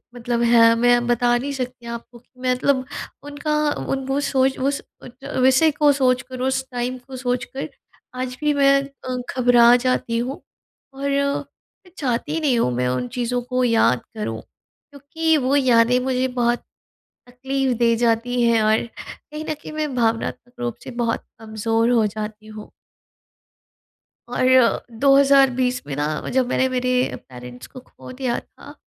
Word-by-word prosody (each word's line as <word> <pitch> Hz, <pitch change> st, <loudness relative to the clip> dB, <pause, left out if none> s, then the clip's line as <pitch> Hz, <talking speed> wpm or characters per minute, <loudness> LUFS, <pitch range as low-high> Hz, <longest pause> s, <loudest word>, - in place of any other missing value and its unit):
मतलब 240 Hz, 0 st, -2 dB
है 230 Hz, -1 st, +6 dB
मैं 240 Hz, +1 st, +3 dB
बता 240 Hz, 0 st, +2 dB
नहीं 275 Hz, +4 st, -4 dB
सकती 250 Hz, -2 st, -6 dB
आपको 235 Hz, +1 st, -8 dB
कि 240 Hz, -, -36 dB
मैं 255 Hz, 0 st, +2 dB
मतलब 260 Hz, +1 st, 0 dB, 0.4 s
उनका 290 Hz, +1 st, -4 dB, 0.4 s
उन 270 Hz, +1 st, -2 dB
सोच 265 Hz, -1 st, +1 dB
वो 270 Hz, +2 st, +1 dB
सोच 255 Hz, -3 st, -10 dB
उस 285 Hz, -, -5 dB
विषय 265 Hz, +5 st, +5 dB
को 295 Hz, 0 st, +3 dB
सोचकर 255 Hz, -1 st, 0 dB
उस 265 Hz, 0 st, 0 dB
टाइम 250 Hz, +1 st, -3 dB
को 265 Hz, -1 st, -8 dB
सोच 250 Hz, 0 st, -1 dB
कर 270 Hz, -, -5 dB, 0.5 s
आज 255 Hz, 0 st, -4 dB
भी 300 Hz, 0 st, +2 dB
मैं 275 Hz, -1 st, +4 dB
अ, 275 Hz, -2 st, -7 dB, 0.2 s
घबरा 245 Hz, -1 st, +6 dB
जाती 245 Hz, -2 st, 0 dB
हूँ 255 Hz, +4 st, -3 dB, 0.5 s
और 275 Hz, +1 st, -3 dB
मैं 280 Hz, +6 st, -4 dB
चाहती 275 Hz, +4 st, -2 dB
नहीं 275 Hz, -7 st, +1 dB
हूँ 125 Hz, -, +1 dB
मैं 125 Hz, +1 st, 0 dB
उन 125 Hz, 0 st, -1 dB
चीज़ों 245 Hz, 0 st, -1 dB
को 250 Hz, +1 st, -1 dB
याद 225 Hz, -, +3 dB
करूँ। 110 Hz, +1 st, -4 dB
क्योंकि 310 Hz, +3 st, -4 dB
वो 270 Hz, 0 st, +1 dB
यादें 250 Hz, -2 st, +4 dB
मुझे 255 Hz, 0 st, 0 dB
बहुत 240 Hz, -1 st, 0 dB, 0.7 s
तकलीफ़ 265 Hz, +1 st, -2 dB
दे 235 Hz, -1 st, +3 dB
जाती 235 Hz, +1 st, +1 dB
हैं 230 Hz, -2 st, +3 dB
और 215 Hz, +1 st, +3 dB, 0.2 s
कहीं 305 Hz, 0 st, -9 dB
न 310 Hz, -, -3 dB
कहीं 305 Hz, -, -11 dB
मैं 305 Hz, -3 st, -3 dB
भावनात्मक 230 Hz, +1 st, -1 dB
रूप 240 Hz, -2 st, -3 dB
से -, -, -7 dB
बहुत 230 Hz, -1 st, -1 dB, 0.2 s
कमज़ोर 225 Hz, +1 st, 0 dB
हो 230 Hz, -3 st, +3 dB
जाती 215 Hz, +1 st, -6 dB
हूँ। 215 Hz, -1 st, -10 dB, 1.6 s
और 255 Hz, 0 st, +3 dB, 0.2 s
2020 275 Hz, -2 st, +4 dB
में 145 Hz, -, -4 dB
ना 145 Hz, 0 st, -1 dB, 0.3 s
जब 260 Hz, -1 st, +2 dB
मैंने 260 Hz, +1 st, +1 dB
मेरे 255 Hz, -1 st, -1 dB, 0.4 s
पेरेंट्स 125 Hz, -1 st, -10 dB
को 255 Hz, -, -12 dB
खो 255 Hz, -, -13 dB
दिया 255 Hz, -2 st, -2 dB
था। -, -, -15 dB
250 Hz, 160 wpm, -21 LUFS, 235-270 Hz, 1.6 s, है